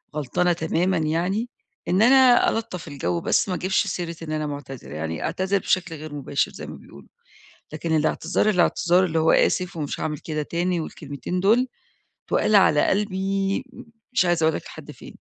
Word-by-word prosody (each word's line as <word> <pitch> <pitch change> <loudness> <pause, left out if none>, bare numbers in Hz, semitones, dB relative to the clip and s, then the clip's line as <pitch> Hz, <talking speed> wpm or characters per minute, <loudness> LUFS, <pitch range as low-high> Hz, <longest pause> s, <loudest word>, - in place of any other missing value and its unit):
غلطانة 155 +5 +1
تمامًا 175 +3 0
يعني، 175 +9 -1 0.4
إن 185 +3 +2
أنا 255 0 +6
ألطَّف 220 -7 -4
الجو 90 - -2
بس - - +1
ما 180 - 0
اجيبش 190 +4 0
سيرة 175 -2 -4
إن 155 - -6
أنا 155 -1 -2
معتذرة، 140 -3 -8
يعني 80 0 -4
أعتذر 190 +1 0
بشكل 175 -2 -1
غير 155 0 -8
مباشر 140 0 -1
زي - - -8
ما - - -8
بيقولوا. 70 -1 -16 0.6
لكن 160 +1 -1
الاعتذار، 160 +6 +1
الاعتذار 180 -1 +3
اللي 165 -2 0
هو 160 - +4
آسف 180 -1 +2
ومش 145 -2 -4
هاعمل 150 -1 -2
كده 155 -1 -3
تاني 175 +3 -1
والكلمتين 155 +2 -5
دول، 225 +7 +3 0.6
تُقال 215 - +2
على 155 -6 +5
قلبي 195 +1 -1 0.5
مش 185 - +3
عايزة 175 -2 +1
أقول 160 - +2
لك - - -5
لحد - - -10
فين. - - -13
175 Hz, 170 wpm, -23 LUFS, 155-190 Hz, 0.6 s, أنا